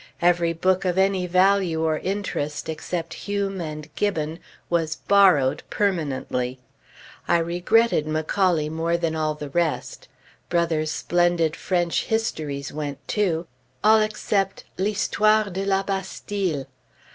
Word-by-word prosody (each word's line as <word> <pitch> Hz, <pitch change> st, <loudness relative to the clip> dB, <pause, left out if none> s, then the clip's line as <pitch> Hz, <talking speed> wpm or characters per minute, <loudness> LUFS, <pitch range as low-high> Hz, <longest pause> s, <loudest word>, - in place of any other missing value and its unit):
Every 170 Hz, -1 st, +3 dB
book 185 Hz, +3 st, +1 dB
of 180 Hz, -1 st, 0 dB
any 190 Hz, -1 st, +2 dB
value 185 Hz, -2 st, +3 dB
or 155 Hz, -1 st, +1 dB
interest, 180 Hz, -7 st, -3 dB
except 165 Hz, +1 st, -4 dB
Hume 200 Hz, -2 st, -3 dB
and 155 Hz, -2 st, -6 dB
Gibbon, 165 Hz, -5 st, -1 dB, 0.3 s
was 165 Hz, -2 st, 0 dB
"borrowed" 185 Hz, -11 st, +4 dB
permanently. 140 Hz, -9 st, -1 dB, 0.7 s
I 170 Hz, -, +4 dB
regretted 175 Hz, +2 st, +2 dB
Macaulay 155 Hz, +1 st, +1 dB
more 165 Hz, +2 st, 0 dB
than 165 Hz, -2 st, -1 dB
all 155 Hz, -1 st, 0 dB
the 150 Hz, -2 st, -7 dB
rest. 170 Hz, 0 st, -1 dB, 0.4 s
Brother's 165 Hz, -3 st, +1 dB
splendid 175 Hz, -1 st, +1 dB
French 175 Hz, -2 st, 0 dB
histories 150 Hz, -12 st, -2 dB
went, 145 Hz, -2 st, -5 dB
too; 175 Hz, -5 st, 0 dB, 0.4 s
all 220 Hz, +1 st, +6 dB
except 205 Hz, -2 st, -1 dB, 0.2 s
"L'Histoire 215 Hz, +1 st, +2 dB
de 190 Hz, +2 st, -3 dB
la 195 Hz, 0 st, +2 dB
Bastille." 190 Hz, -5 st, -3 dB
175 Hz, 120 wpm, -24 LUFS, 155-195 Hz, 0.7 s, all